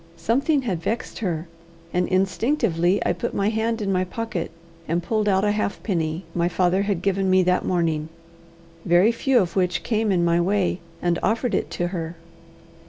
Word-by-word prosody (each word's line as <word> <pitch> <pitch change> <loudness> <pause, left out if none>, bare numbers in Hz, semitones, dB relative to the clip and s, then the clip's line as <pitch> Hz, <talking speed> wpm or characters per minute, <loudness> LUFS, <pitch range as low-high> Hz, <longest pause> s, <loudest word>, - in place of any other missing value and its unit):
Something 265 - +1
had 185 -9 -2
vexed 225 +7 -3
her, 170 -5 -2 0.5
and 180 0 +1
instinctively 190 - +1
I - - +2
put 175 - -4
my 200 +1 +2
hand 225 0 -1
in 195 - 0
my 185 -1 +2
pocket, 185 -2 -4 0.4
and 170 +2 0
pulled 215 +1 0
out 190 +1 +2
a 205 - +3
halfpenny 180 -5 -2
my 170 0 +1
father 180 +2 +2
had 200 -3 -1
given 195 -1 +1
me 185 0 +5
that 180 0 +1
morning 160 -3 0 0.7
very 175 +5 +4
few 260 +2 +1
of 180 -7 +1
which 180 -2 +1
came 220 -2 0
in 175 -2 +2
my 170 0 +3
way 190 0 +1 0.2
and 175 -1 +1
offered 230 +3 0
it - - 0
to 175 0 0
her. 170 -2 -4
185 Hz, 175 wpm, -23 LUFS, 175-215 Hz, 0.7 s, me